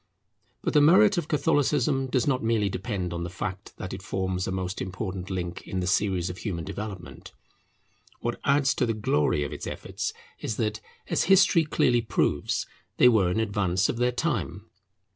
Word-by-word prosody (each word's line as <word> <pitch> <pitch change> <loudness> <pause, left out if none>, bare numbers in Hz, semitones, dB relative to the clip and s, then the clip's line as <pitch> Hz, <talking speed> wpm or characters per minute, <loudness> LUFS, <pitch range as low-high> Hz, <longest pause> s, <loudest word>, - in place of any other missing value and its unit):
But - - -1
the 150 - +6
merit 190 +5 +6
of 160 - -5
Catholicism 145 -3 +1
does 130 -2 +1
not 130 -3 +1
merely 110 -3 +1
depend 95 -3 -3
on 85 - -4
the 85 - -4
fact 95 +1 -6
that 95 - -6
it 95 - -6
forms 95 -2 -2
a - - -2
most 95 0 -3
important 95 0 -5
link 90 -2 -4
in 95 - -2
the 90 - -1
series 95 -2 +1
of 90 0 -6
human 85 -7 -4
development. 100 -3 -7 0.9
What 120 0 -3
adds 140 -1 +3
to 125 - 0
the 115 - 0
glory 75 -8 +1
of 70 - -5
its - - -6
efforts - - -4 0.3
is 110 - -3
that, 110 -2 -1 0.3
as - - +1
history 185 -2 +5
clearly 120 -5 +2
proves, 110 - 0 0.3
they 125 - +7
were 105 -7 +3
in 90 - 0
advance 100 -3 +1
of - - -2
their 125 +1 +2
time. 120 - -2
105 Hz, 180 wpm, -26 LUFS, 95-130 Hz, 0.9 s, they